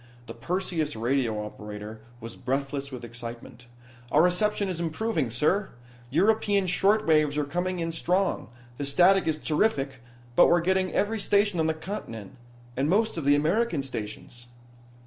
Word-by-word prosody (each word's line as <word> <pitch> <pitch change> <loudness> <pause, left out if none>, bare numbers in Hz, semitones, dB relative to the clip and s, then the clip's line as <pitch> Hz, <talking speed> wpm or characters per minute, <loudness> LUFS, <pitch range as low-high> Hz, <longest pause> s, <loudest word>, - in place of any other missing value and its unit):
The - - -8
Perseus 165 +2 -2
radio 115 -2 0
operator 105 +1 -8 0.2
was 115 -1 -9
breathless 135 +2 -3
with 125 -2 -7
excitement. 120 +1 -9 0.4
"Our 150 - +5
reception 200 +3 +2
is 180 -3 -3
improving, 165 - -1
sir. 155 - +1 0.4
European 200 - +2
short 200 +4 +2
waves 155 -2 +3
are 150 - +1
coming 180 +5 -2
in 165 0 -2
strong. 180 - 0 0.3
The 145 - -3
static 180 +7 +4
is 155 -1 +1
terrific, 145 - 0 0.3
but - - +7
we're 175 0 +4
getting 185 +1 +1
every 220 +2 0
station 200 -2 +2
on 160 - +2
the 160 - 0
continent, 135 - -7 0.4
and 135 +3 0
most 220 +5 +2
of 165 -4 -4
the 145 0 +5
American 165 +2 +1
stations." 120 -1 -7
155 Hz, 150 wpm, -27 LUFS, 130-190 Hz, 0.4 s, but